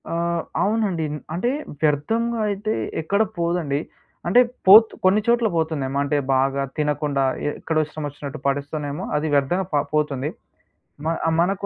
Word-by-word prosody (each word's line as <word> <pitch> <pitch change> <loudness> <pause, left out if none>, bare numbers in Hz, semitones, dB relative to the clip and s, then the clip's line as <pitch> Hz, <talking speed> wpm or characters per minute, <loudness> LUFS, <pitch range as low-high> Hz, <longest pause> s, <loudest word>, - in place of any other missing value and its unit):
ఆ! - - -3 0.5
అవునండి. 200 -6 0 0.3
అంటే, 185 +9 0 0.3
వ్యర్ధంగా 225 +11 +1
అయితే 205 +2 -2 0.3
ఎక్కడ 200 +7 +1 0.2
పోదండి. 170 -4 0 0.5
అంటే, 185 +8 +5 0.3
పోత్ 220 +4 +9
కొన్ని‌చోట్ల 220 +4 +3
పోతుందేమో, 145 -4 -1
అంటే, 145 +1 0 0.2
బాగా 135 +1 +1
తినకుండా 150 -2 0 0.2
ఎ - - +2
ఎక్కడో 160 -1 0
ఇష్టమోచ్చినట్టు 145 -3 -6
పడేస్తేనేమో 145 +3 -2
అది 155 +1 -1
వ్యర్థంగ 145 +7 +2
ప - - +2 0.2
పోతుంది. 150 -2 0 0.8
మ - - 0 0.3
మనకు 195 +3 0
155 Hz, 125 wpm, -22 LUFS, 145-195 Hz, 0.8 s, పోత్